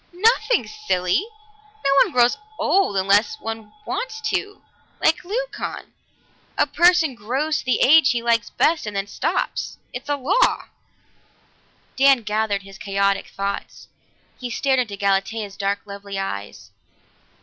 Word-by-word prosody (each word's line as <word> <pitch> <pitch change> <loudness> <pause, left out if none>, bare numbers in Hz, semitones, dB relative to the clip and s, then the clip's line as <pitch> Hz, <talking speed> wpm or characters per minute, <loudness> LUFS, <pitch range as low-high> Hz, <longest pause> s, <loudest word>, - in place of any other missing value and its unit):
"Nothing, 440 +5 +2
silly! 395 - -1 0.6
No 275 - +3
one - - +3
grows 245 -1 +4 0.2
old 380 - +2
unless 200 - +3
he 225 - -6 0.2
wants 465 -3 -4
to, 400 +1 -3 0.4
like 325 - +2
Leucon. - - -5 0.6
A - - +4
person 345 -4 +3
grows 260 +8 -1
to - - -9
the 255 - +1
age 310 0 +6
he 240 -3 0
likes 230 -2 +1
best 315 -7 +1
and 210 - -5
then 195 0 -1
stops. 200 - -2 0.2
It's 245 +3 -7
a 290 - +2
law!" 345 - +1 1.3
Dan 270 -2 +5
gathered 210 -1 -1
his 195 0 -13
chaotic 200 0 0
thoughts. 200 0 -5 0.5
He 250 - -5
stared 265 +2 +1
into 215 -5 -2
Galatea's 200 +1 -1
dark, 200 0 -1
lovely 200 -1 -7
eyes. 100 - -6
235 Hz, 135 wpm, -22 LUFS, 200-320 Hz, 1.3 s, age